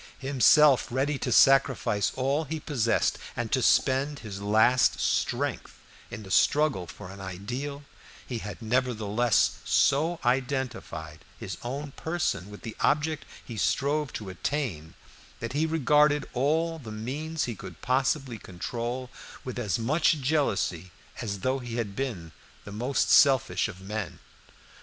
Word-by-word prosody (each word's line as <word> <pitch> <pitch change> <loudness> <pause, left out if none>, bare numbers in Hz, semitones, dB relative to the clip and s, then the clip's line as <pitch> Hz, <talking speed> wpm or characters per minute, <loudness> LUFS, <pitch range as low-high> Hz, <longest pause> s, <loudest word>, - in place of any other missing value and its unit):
Himself 140 +1 +5
ready 135 +3 -1
to 125 - -2
sacrifice 130 -5 +4
all 140 +4 0
he 160 +2 -4
possessed, 125 -7 0 0.2
and - - -3
to - - +2
spend 140 +2 +2
his 100 -2 -6
last 110 +5 +3
strength - - -1 0.3
in 110 - -7
the 95 - -10
struggle 145 - +3
for 90 - -10
an 100 0 -10
ideal, 120 +10 -5 0.4
he 120 -3 -4
had 105 +2 -8
nevertheless 120 -1 +1
so 160 +5 +2
identified 125 - -2 0.2
his - - -6
own 140 +4 -5
person 160 - -2
with 105 - -11
the 110 -2 -6
object 155 +1 +1 0.2
he 115 - -8
strove 145 +5 0
to 105 -3 -6
attain 95 - -3 0.4
that 115 +2 -5
he 155 +3 +1
regarded 150 -1 +3
all 160 +5 0
the 115 -7 -9
means 145 +9 -3
he 120 - -2
could 90 -5 -10
possibly 130 -1 0
control 120 +8 -5 0.3
with 125 -1 -5
as 105 -7 0
much 155 +9 +2
jealousy 130 - -1 0.3
as 100 -4 -4
though 130 +4 0
he 120 -2 -6
had 105 -5 -3
been 100 -12 -4 0.3
the 100 - -10
most 125 +6 0
selfish 135 -4 +5
of 95 -4 -9
men. 105 +1 -5
125 Hz, 140 wpm, -27 LUFS, 105-145 Hz, 0.4 s, Himself